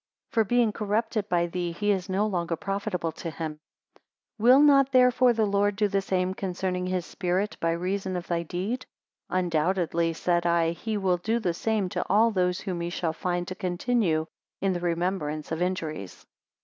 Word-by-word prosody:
For 225 - +3
being 235 +1 +2
corrupted 215 0 -1
by 175 -1 +2
thee, 175 0 -3
he 205 +4 0
is 190 -2 -1
no 195 +3 +1
longer 175 -5 -1
profitable 195 -2 -2
to 165 - -6
him. 155 -1 -5 0.8
273 - - -7
Will 250 +3 +8
not 275 -2 +5
therefore 250 -1 +5
the 225 -2 +1
Lord 200 0 +1
do 210 +1 +2
the 195 0 0
same 185 -1 0
concerning 180 -1 -2
his 185 -2 -1
Spirit, 185 +2 -1
by 165 - +1
reason 185 +2 -2
of 175 -1 -4
thy 170 -1 -1
deed? 190 +9 -4 0.4
Undoubtedly, 170 -1 +1
said 175 +1 0
I, 170 -1 +2
he 215 +5 -3
will 185 -3 +1
do 220 +6 0
the 185 -7 -1
same 215 +2 0
to - - -2
all 220 +4 +4
those 180 -2 0
whom 180 -4 -3
he 170 - -2
shall 170 -2 -2
find 175 +1 -2
to - - -3
continue 180 -2 0 0.3
in 195 -1 +1
the 175 - -2
remembrance 170 -3 -2
of 160 +1 -2
injuries. 160 - -3
185 Hz, 185 wpm, -27 LUFS, 170-210 Hz, 0.8 s, Will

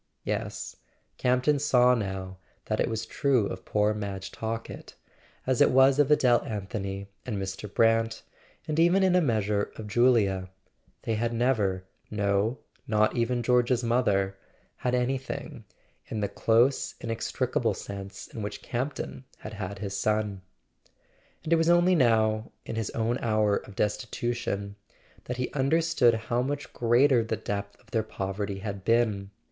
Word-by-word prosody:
Yes; - - -3 0.4
Campton 130 +3 +2
saw 125 -3 +4
now 95 -4 -3 0.3
that - - -1
it - - +1
was 110 0 -3
true 130 -3 +1
of 95 -1 -6
poor 105 0 +2
Madge 100 -2 -5
Talkett, 115 0 -6 0.5
as 130 -1 +1
it - - +7
was 135 +2 +5
of 145 -1 +4
Adele 125 -5 +4
Anthony 100 -2 -4 0.2
and 120 -5 -3
Mr. 95 +1 -5
Brant, 115 0 +2 0.4
and 155 +1 -1
even 175 +4 +4
in 185 -1 +4
a 180 - +5
measure 105 - 0
of 110 - -7
Julia. 105 -5 +3 0.5
They 115 - -1
had 115 +2 -1
never 110 -6 +1 0.3
—no, 100 +3 0 0.3
not 110 +2 +2
even 120 0 0
George's 125 0 +2
mother—had 115 +1 -1
anything, 130 +1 -3 0.4
in 110 - -4
the 100 - +1
close 120 +4 +2
inextricable 115 -1 -1
sense 100 -1 -7
in 110 - -8
which 105 - -5
Campton 130 +1 -4
had - - -9
had 100 -1 -5
his 100 0 -4
son. 105 -1 0 1.0
And 160 - +1
it - - +5
was 165 +1 +2
only 175 +1 +5
now, 110 -6 +2
in - - -5
his 110 -2 -2
own 115 +2 0
hour 110 -3 +2
of 100 - -10
destitu¬ 110 +3 -1
tion, 100 -4 -4 0.5
that 125 - -4
he 125 - -2
understood 140 -3 +3
how 115 +2 -1
much 145 +2 -4
greater 120 +1 +4
the 110 0 -2
depth 100 0 -5
of 115 -3 -25
their 110 - +2
poverty 100 -1 -4
had 100 -1 -5
been. 110 -3 +1
115 Hz, 150 wpm, -28 LUFS, 100-125 Hz, 1.0 s, it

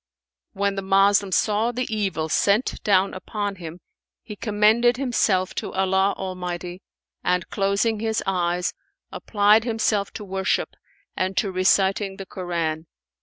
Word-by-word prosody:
When 200 0 0
the 195 - -3
Moslem 195 +1 +3
saw 215 +4 +1
the 250 +1 -2
evil 185 -7 -1
sent 200 +8 +1
down 195 -1 +3
upon 205 +1 -4
him, 170 0 -9 0.4
he 210 - -8
commended 220 +4 +3
himself 220 -8 +1
to - - -5
Allah 190 +1 +2
Almighty 180 -1 -5 0.4
and 180 -1 0
closing 200 +3 0
his 220 0 -1
eyes, 180 -2 0 0.4
applied 210 +1 +3
himself 220 -3 0
to 210 - -7
worship 190 0 -1 0.5
and 185 0 -2
to 200 - +1
reciting 195 +1 +1
the 195 - -7
Koran. 170 -4 -3
195 Hz, 130 wpm, -23 LUFS, 185-210 Hz, 0.5 s, Moslem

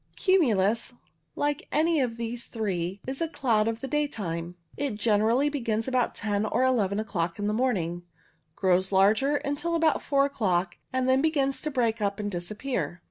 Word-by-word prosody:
Cumulus, 235 - +2 0.4
like 290 +4 -1
any 320 +1 +2
of 235 -3 -2
these 235 +1 -5
three, 195 -4 -3
is 265 +3 -5
a 330 - +1
cloud 230 -8 +1
of 230 0 -2
the 270 - -4
daytime. 185 - -2 0.2
It 280 -6 -2
generally 220 +5 +2
begins 230 -6 -1
about 255 -2 0
ten 205 -1 -1
or 220 +4 +1
eleven 215 -6 +2
o'clock 170 -6 -2
in 205 - -3
the 210 - 0
morning, 190 -8 0 0.5
grows 185 0 +2
larger 215 +9 +4
until 295 +4 -1
about 320 -2 +2
four 275 -1 +2
o'clock, 185 -9 -1
and 260 0 0
then 260 +1 +4
begins 280 -3 +1
to 305 - -2
break 230 -5 0
up 200 0 -1
and 205 -1 -3
disappear. 180 - -3
230 Hz, 170 wpm, -27 LUFS, 200-275 Hz, 0.5 s, larger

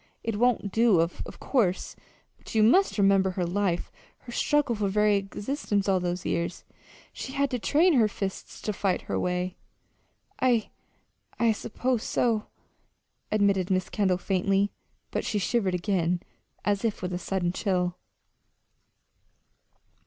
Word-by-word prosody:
"It 225 -2 -2
won't 240 -4 +2
do, 225 -5 +4
of 165 +1 -2
course; 200 -9 0 0.4
but - - -11
you 215 - +5
must 370 - +4
remember 195 -1 +4
her 185 -1 -2
life, 180 -1 -1 0.3
her 240 - -10
struggle 295 0 +1
for 210 -2 -1
very 210 +1 +3
existence 200 +1 -2
all 190 -1 +3
those 180 0 -3
years. 170 +1 -2 0.5
She 265 - -6
had 280 0 +1
to 250 - -1
train 320 +9 +3
her 235 -6 +5
fists 195 -2 -6
to 210 - -1
fight 190 -2 0
her - - -2
way." 180 0 -2 0.8
"I 240 -4 +2 0.7
I 235 -1 +4
suppose 240 +3 -1
so," 225 -3 0 0.8
admitted 200 -3 +2
Mrs. 185 -1 0
Kendall, 190 -4 +2
faintly; 195 +2 +1 0.4
but - - -1
she 215 - -1
shivered 195 -1 +1
again, 180 -2 0 0.4
as 205 0 +1
if 220 -4 -1
with 180 0 -2
a 175 - -2
sudden 185 -2 -1
chill. 180 -2 0
200 Hz, 140 wpm, -27 LUFS, 185-225 Hz, 0.8 s, you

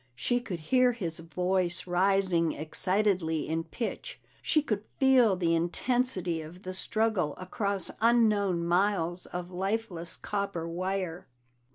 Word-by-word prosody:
She 245 - 0
could 190 -9 -6
hear 250 +8 +3
his 170 -9 -4
voice 180 +2 0
rising 180 -2 +2
excitedly 180 0 0
in 165 +1 -2
pitch, 245 - -5 0.2
she 305 - +2
could 215 -7 -2
feel 255 -6 +5
the 170 -2 +1
intensity 180 0 +1
of 165 +4 -11
the 185 - -5
struggle 210 -5 0
across 200 +1 -2
unknown 210 -7 +3
miles 175 -1 +1
of 180 0 -6
lifeless 185 -3 -3
copper 200 -5 -3
wire. 185 0 -3
185 Hz, 125 wpm, -29 LUFS, 170-215 Hz, 0.2 s, feel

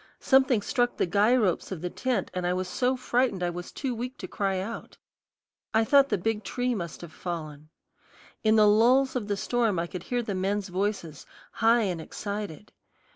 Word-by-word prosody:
Something 265 -5 +3
struck 245 0 0
the - - +2
guy 205 +7 +3
ropes 200 -8 0
of 180 -5 -5
the 180 - -2
tent, 245 -7 -1
and 180 -1 -2
I 180 - +1
was 185 0 -2
so 250 +7 0
frightened 245 -6 0
I 175 - 0
was 175 +1 -7
too 265 -3 -3
weak 250 +3 -5
to - - -7
cry 195 -2 -1
out. 215 +5 -6 0.8
I 220 0 +4
thought 280 +2 +5
the - - +1
big 215 +3 -1
tree 245 +4 -1
must 170 -7 -5
have 170 -2 -10
fallen. 155 -4 -6 0.7
In 220 0 +4
the 215 -1 +6
lulls 245 +6 +4
of 230 -5 -2
the 205 -1 -1
storm 230 -3 0
I 170 - 0
could 175 0 -7
hear 245 +5 -2
the 215 -3 -3
men's 195 +1 -1
voices, 180 -5 -3 0.2
high 230 +1 +3
and 180 -5 -2
excited. 205 0 -6
210 Hz, 195 wpm, -27 LUFS, 180-245 Hz, 0.8 s, the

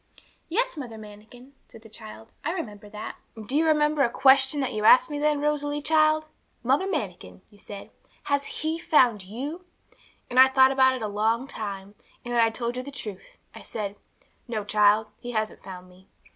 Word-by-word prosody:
'Yes, 475 +3 -1
Mother 240 -6 -7
Manikin,' 220 +5 -14
said 225 - -15
the - - -13
child, 110 - -12
'I 325 - -1
remember 210 - -7
that.' 210 0 -8 0.2
'And 220 -2 -10
do 265 - -2
you 320 +2 +3
remember 300 -1 +2
a 255 - +3
question 265 +3 +4
that 265 - -2
you 215 -1 -3
asked 255 +8 +6
me 290 - -3
then, 300 -1 +1
Rosalie, 295 0 -1
child! 310 0 +3 0.4
"Mother 270 +10 +2
Manikin," 180 - -5
you 205 - -20
said, 200 -1 -10 0.3
"has 285 0 -1
He, 315 +2 -3
found 245 - +3
you?" 275 - -6 0.6
And 250 - +1
I 260 - +10
thought 265 0 +5
about 260 -1 +4
it 250 - -6
a - - -1
long 220 +5 0
time; 200 -5 -7 0.3
and 240 - -4
then 235 - +4
I 225 - +4
told 235 +2 -4
you - - -2
the 265 - -9
truth. 210 -9 -8 0.2
I - - -11
said, 205 -2 -5 0.5
"No, 220 -3 -3
child, 210 +1 +3
He 245 0 -7
hasn't 215 -1 -2
found 185 -1 -10
me." 185 +1 -20
245 Hz, 195 wpm, -25 LUFS, 210-290 Hz, 0.6 s, I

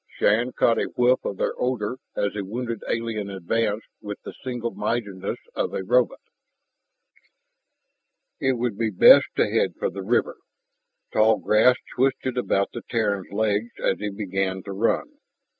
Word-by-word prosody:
Shann 115 +5 +2
caught 115 -1 +3
a - - -1
whiff 125 +1 +3
of 100 - -4
their - - 0
odor 125 -1 -1 0.2
as 100 - 0
the 105 - -3
wounded 115 +2 -4
alien 115 -3 -2
advanced 105 +3 -1 0.2
with 105 -1 -6
the - - -8
single 120 -3 -3
mindedness 100 -5 -3 0.2
of - - -2
a - - -2
robot. 125 +5 +2 2.2
It 130 - +2
would 120 -4 -2
be 115 -1 +1
best 95 - +7
to - - +3
head - - 0
for - - -1
the 100 - -6
river. 115 +6 0 0.8
Tall 110 0 +4
grass 110 +4 +4 0.2
twisted 130 0 0
about 100 -5 0
the 120 - -5
Terran's 105 -5 -1
legs 110 +2 0
as - - 0
he 105 - -2
began 95 -2 -2
to 100 - -7
run. 285 - -1
110 Hz, 155 wpm, -24 LUFS, 100-120 Hz, 2.2 s, best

